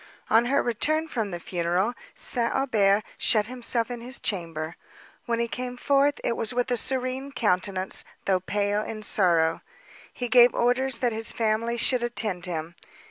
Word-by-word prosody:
On 230 +2 +5
his 270 +3 +2
return 310 +7 +1
from 225 -9 -2
the 175 -2 -5
funeral, 175 +6 -1 0.2
St. 235 -1 0
Aubert 215 -6 +2 0.2
shut 215 -3 +3
himself 240 0 -1
in 240 -1 -6
his 255 +3 -4
chamber. 165 -5 -3 0.5
When 235 -1 0
he 235 - 0
came 250 +1 -5
forth, 280 +2 +2
it 235 - 0
was 225 +2 -1
with 245 0 0
a - - +3
serene 260 +2 -2
countenance, 190 -5 +1 0.2
though 190 -1 +2
pale 205 +2 -1
in 215 0 -6
sorrow. 170 -5 +2 0.5
He 245 - -4
gave 245 0 +6
orders 250 +1 +1
that 245 -3 0
his 225 +1 +1
family 230 +1 0
should 245 +2 +2
attend 220 -7 -1
him. 165 -1 -4
230 Hz, 165 wpm, -26 LUFS, 195-245 Hz, 0.5 s, gave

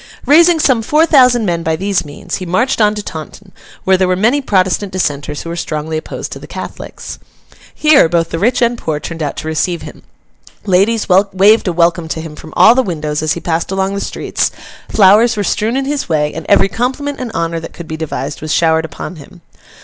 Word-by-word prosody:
Raising 335 +3 +5
some 260 -7 +2
four 300 +8 +3
thousand 250 -7 +4
men 170 -3 -1
by 160 -1 -1
these 195 +2 -1
means, 145 -1 -6
he 185 - -6
marched 235 +8 0
on 210 0 +3
to 210 - -5
Taunton, 185 +4 -9 0.3
where 190 0 +3
there 185 0 +1
were 185 - +1
many 235 +10 +2
Protestant 190 -3 0
dissenters 150 -5 -3
who 165 - -7
were - - -4
strongly 155 -1 -4
opposed 155 - -5
to - - -7
the - - -11
Catholics. - - -8 0.6
Here, 300 - +4
both 165 -1 0
the 165 - -2
rich 245 +5 +2
and 235 0 0
poor 155 -2 -2
turned 165 +1 -7
out 145 -2 -3
to - - -5
receive 160 +2 -1
him, - - -11 0.6
ladies 205 +4 +2
waved 195 +3 +4
a - - +1
welcome 170 0 +1
to 160 - -4
him 160 -1 -8
from 155 - -12
all 225 - +7
the 260 - +2
windows 155 -8 -3
as 155 0 0
he - - -5
passed 165 -1 -2
along 190 0 -1
the 200 - -3
streets, - - -2 0.4
flowers 215 +4 +4
were 205 - 0
strewn 215 +6 0
in 270 - -1
his 285 -6 -3
way, 150 -2 0
and 160 - -7
every - - +5
compliment 265 +8 -3
and 250 -3 -5
honour 165 -2 -2
that 165 - -9
could 170 - -10
be 160 - -5
devised 150 -2 -5
was 155 0 -4
showered 160 -1 +2
upon 160 +3 -8
him. 160 +4 -14
185 Hz, 220 wpm, -15 LUFS, 160-225 Hz, 0.6 s, all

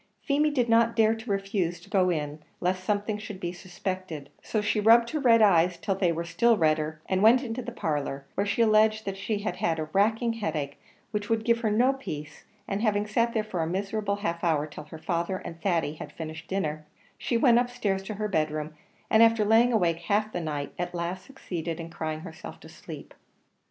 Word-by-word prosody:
Feemy 295 +2 +2
did 255 -5 +1
not 230 0 +4
dare 220 -1 +4
to 225 +1 -8
refuse 195 -3 -1
to - - -17
go 190 -2 +2
in 150 -3 -2 0.2
lest 185 +1 -1
something 210 +1 -1
should 210 -2 -8
be 175 -1 -3
suspected; 180 -4 -6
so 220 - -1
she 210 +1 0
rubbed 230 +2 +5
her 310 - -1
red 230 -5 +5
eyes 175 -3 +4
till 195 - -1
they 185 -2 +1
were 170 +1 -2
still 225 +8 +3
redder, 155 -1 +1
and 190 0 +1
went 235 +5 +6
into 240 0 -4
the 245 0 -6
parlour, 145 -9 -3
where 200 +1 -1
she 215 +3 +2
alleged 215 0 +3
that 195 -1 -3
she 205 +2 -2
had 180 -4 0
a 160 - -1
racking 225 +4 +2
headache, 155 -10 -3 0.3
which 210 -2 -3
would 225 -1 0
give 235 -1 +3
her 225 -2 0
no 245 +6 +3
peace; 150 - -7 0.2
and 195 +1 -2
having 210 -2 +1
sat 230 +3 0
there 220 - +2
for 185 -5 -3
a 160 - 0
miserable 200 +3 -1
half 170 -5 -3
hour 155 -4 +2
till 150 0 -10
her 155 +1 -10
father 170 +3 -2
and 165 -2 -9
Thady 170 -5 0
had 155 - -9
finished 160 0 -8
their 195 - 0
dinner, 155 -3 -3 0.3
she 235 - 0
went 240 -1 +5
up 245 0 0
stairs 200 -6 -1
to 215 - -5
her 210 +1 -2
bed 155 -6 +1
room, 155 0 -5 0.3
and 220 - +4
after 230 -2 +5
laying 225 +3 +5
awake 175 -7 +2
half 210 +5 0
the 175 - -3
night, 150 -3 -4
at 175 0 -3
last 175 +2 -3
succeeded 175 -11 -5
in 165 0 -7
crying 155 -1 -4
herself 160 -2 -9
to - - -12
sleep. - - -10
195 Hz, 220 wpm, -27 LUFS, 165-220 Hz, 0.3 s, went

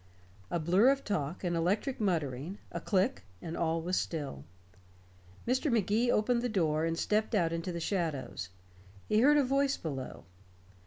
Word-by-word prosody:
A 175 - 0
blur 185 +10 +4
of 275 0 +1
talk, 170 -4 -2
an 175 -1 0
electric 195 +10 0
muttering, 160 -2 -1
a - - -4
click, 200 +7 +1 0.2
and 165 0 -6
all 165 0 0
was 180 +2 0
still. 140 - -3 1.0
Mr. 260 +4 +1
Magee 225 +2 +2
opened 235 +3 +2
the 245 - -1
door 160 -6 +1
and 165 0 -1
stepped 215 +4 +1
out 170 -4 +2
into 165 +2 -3
the 170 - -4
shadows. 160 - -2 0.6
He 215 - +3
heard 290 +5 +6
a 290 - +5
voice 275 +1 +1
below. 135 -5 -6
185 Hz, 160 wpm, -31 LUFS, 165-230 Hz, 1.0 s, heard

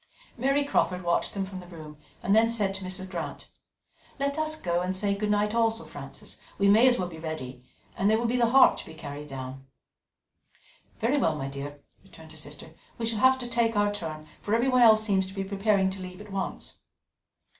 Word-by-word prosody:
Mary 275 +4 +2
Crawford 185 -9 +1
watched 170 +3 0
them 195 -1 -1
from 190 -1 -8
the 180 - -11
room, 155 -3 -10 0.3
and 195 - +3
then 225 +1 +5
said 210 -4 +1
to 190 0 -4
Mrs. 185 +1 -4
Grant: 175 -3 -6 0.7
"Let 280 0 0
us 310 0 0
go 175 0 0
and 185 +1 -1
say 200 +1 0
good 210 +1 -2
night 210 +1 +1
also, 230 0 +1
Frances. - - -8 0.2
We 200 - +3
may 220 +5 +6
as 250 -1 +4
well 180 - -1
be 165 -2 -10
ready 130 -6 -6 0.3
and 195 - +2
there 220 - +4
will 235 - -1
be 235 +2 +1
the 235 -2 +3
harp 265 +2 +6
to - - -6
be 160 - -10
carried 145 -1 -7
down." 135 -1 -8 1.3
"Very 255 +6 +1
well, 160 - +2
my 135 -1 -4
dear," 140 +1 -7 0.2
returned 160 -4 -15
her - - -12
sister. 150 +1 -9 0.3
"We 230 - -2
shall 225 -2 0
have 260 +2 +5
to 250 -2 -4
take 230 -2 +1
our 205 0 +2
turn, 155 -6 -5 0.2
for 210 - 0
everyone 255 +2 +3
else 220 -2 +7
seems 195 -3 +1
to 190 - -11
be 195 - -2
preparing 195 0 +1
to 190 0 -7
leave 180 0 -8
at 210 -1 -11
once." 195 0 -5
195 Hz, 215 wpm, -27 LUFS, 170-225 Hz, 1.3 s, else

